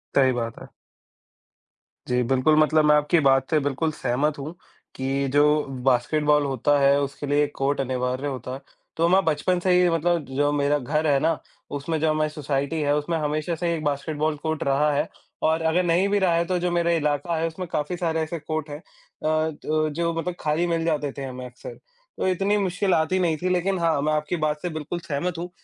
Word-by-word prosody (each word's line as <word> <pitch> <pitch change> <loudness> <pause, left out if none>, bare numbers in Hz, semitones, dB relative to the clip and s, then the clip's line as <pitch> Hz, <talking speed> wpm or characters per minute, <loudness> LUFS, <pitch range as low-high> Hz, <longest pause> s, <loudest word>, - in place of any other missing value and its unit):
सही 130 -2 +5
बात 115 -2 -4
है। - - -11 1.4
जी, 125 0 +1
बिल्कुल, 135 +5 +3
मतलब 155 0 +4
मैं 150 0 +6
आपकी 150 +3 +3
बात 135 -2 +3
से 155 - +3
बिल्कुल 145 +3 -1
सहमत 145 +3 -1
हूँ, 155 +5 -6 0.4
कि 135 +1 -1
जो 150 +1 +4 0.2
बास्केटबॉल 150 +4 +2
होता 140 +2 +1
है, 140 +1 +4
उसके 140 +1 -4
लिए 145 +1 +2
कोर्ट 135 0 0
अनिवार्य 130 +1 -2
होता 130 -2 -5
है। 135 - -7 0.4
तो 165 +1 +3
मैं 190 +1 +4
बचपन 165 +3 +1
से 185 +1 +1
ही 180 0 +4
मतलब 165 0 +1
जो 145 +1 +2
मेरा 145 0 +2
घर 150 +4 -1
है 140 -2 +3
ना, 160 +2 +1 0.3
उसमें 150 +3 -2
जो 160 0 +2
हमारी 155 0 +1
सोसाइटी 145 +1 -2
है, 145 0 +2
उसमें 160 +3 -1
हमेशा 155 +2 -1
से 170 +1 -1
एक 155 - -5
बास्केटबॉल 150 +1 -1
कोर्ट 160 -1 -1
रहा 145 +2 +2
है 140 - 0 0.4
और 160 +1 +1
अगर 165 +3 +2
नहीं 175 +3 +2
भी 205 0 +2
रहा 185 -3 +2
है 170 0 +1
तो 185 0 0
जो 180 0 -1
मेरा 170 0 +1
इलाका 155 +1 0
है, 165 - 0
उसमें 175 +3 -6
काफ़ी 150 +4 -2
सारे 165 -2 -1
ऐसे 160 +1 -3
कोर्ट 155 0 -4
हैं 145 - -5
अ, 180 - -26 0.6
तो 155 +1 -1
जो 170 +2 -1
मतलब 170 +2 -3
खाली 155 +3 0
मिल 165 -1 0
जाते 150 -3 0
थे 140 - -4
हमें 130 -1 -6
अक्सर। 125 0 -10 0.4
तो - - 0
इतनी 195 +3 +1
मुश्किल 190 0 0
आती 165 +3 +1
नहीं 165 -3 +1
थी 180 +3 -2
लेकिन 185 +2 +1
हाँ, 165 -4 +1
मैं 155 +1 +1
आपकी 150 +3 -1
बात 150 -2 -1
से 180 - -2
बिल्कुल 155 +2 -5
सहमत 170 +2 -3
हूँ। 175 +2 -5
155 Hz, 210 wpm, -24 LUFS, 145-170 Hz, 1.4 s, मैं